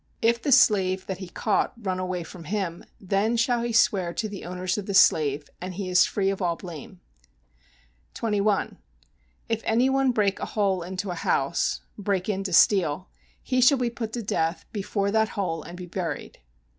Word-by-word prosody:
If 235 +1 +2
the 280 - -1
slave 190 -7 +4
that 190 -1 -5
he 185 -3 -7
caught 205 +4 0
run 190 -4 -2
away 185 -1 -3
from 165 0 -11
him, 185 -2 -3 0.2
then 200 +4 0
shall 240 0 +2
he 235 0 -2
swear 190 -6 +2
to 220 - -1
the 200 -2 -8
owners 180 +1 -2
of 200 - -7
the 200 - -2
slave, 145 -5 +4
and 185 0 -5
he 190 -1 -4
is 180 0 +5
free 195 -1 0
of 195 - -5
all 175 -2 +1
blame. 175 +1 -10 1.2
21. 210 -2 0 0.7
If 225 -2 -1
any 245 +4 +2
one 270 -1 +3
break 205 -4 +1
a - - -3
hole 195 -3 +2
into 185 +2 -4
a - - -2
house 165 -2 0 0.2
[break 195 -2 -1
in 195 -1 -1
to 190 - -2
steal], 180 -2 +3 0.3
he 255 -1 +1
shall 270 +3 +6
be 245 -2 -1
put 225 -2 -5
to 240 - -3
death 165 -3 -1
before 200 -1 -1
that 220 0 +2
hole 165 -5 -1
and 175 +3 -10
be 180 - -7
buried. 180 -1 -5
195 Hz, 190 wpm, -25 LUFS, 180-220 Hz, 1.2 s, shall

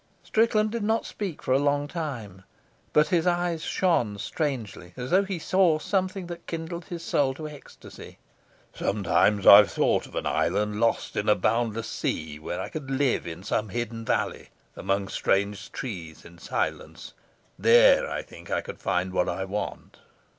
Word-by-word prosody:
Strickland 215 -1 +2
did 230 0 -3
not 220 +2 0
speak 195 -7 -5
for - - -2
a 135 - +4
long 145 0 +1
time, 130 - -6 0.5
but 150 0 +4
his 175 -2 +2
eyes 175 -2 0
shone 120 - +1
strangely, 110 - -4
as 125 0 -5
though 190 +2 +5
he 195 -2 -4
saw 175 -1 +3
something 185 +2 -1
that 170 0 -9
kindled 165 +1 -5
his 170 -3 -7
soul 135 -4 +1
to 155 +1 -6
ecstasy. 150 -2 -12 0.6
"Sometimes 100 +1 +1
I've 100 0 +10
thought - - +1
of - - -14
an - - -2
island 105 0 0
lost 115 0 0
in 105 - 0
a 105 - +6
boundless 115 +2 0
sea, 75 -7 -3
where 80 - -5
I - - -4
could 150 -4 -7
live 135 -1 +1
in 85 +2 -7
some 105 +1 -1
hidden 115 +1 -4
valley, - - -1 0.3
among 100 0 -1
strange 100 0 -1
trees, 90 - -7
in 85 0 -14
silence. - - -4 0.5
There - - +6
I - - -3
think - - -14
I - - 0
could 475 -1 -9
find 90 +1 -1
what 90 - +1
I 95 +2 -2
want." 100 +2 -5
135 Hz, 170 wpm, -26 LUFS, -, 0.6 s, I've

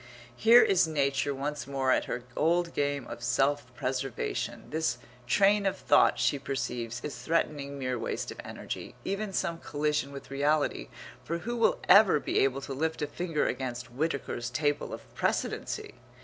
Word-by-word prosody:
Here 230 - +7
is 185 -4 +3
nature 140 -2 +1
once 145 +2 -4
more 135 -1 0
at - - +2
her 125 - -4
old 170 +2 +2
game 145 -2 -1
of 120 - -8
self 130 +2 +1
preservation. 130 -1 -3
This 160 +1 0 0.3
train 200 +5 +4
of 195 - -1
thought, - - +4
she 140 - +1
perceives, 120 -3 -3
is 150 - -4
threatening 145 -4 -1
mere 130 -2 -2
waste - - -3
of - - -8
energy, - - -7
even 200 +1 -2
some 170 -3 -1
collision 150 -2 -1
with 140 -1 -10
reality, 145 +2 +1 0.4
for 170 - -2
who 235 +9 -4
will 230 - +3
ever 200 -5 +7
be - - 0
able 135 0 +2
to 135 - -5
lift 160 +3 -1
a - - +2
finger 160 +1 -2
against 125 -2 -3
Whitaker's 140 -4 -2
Table 145 +2 -1
of - - -6
Precedency? - - -2
145 Hz, 165 wpm, -29 LUFS, 135-165 Hz, 0.4 s, Here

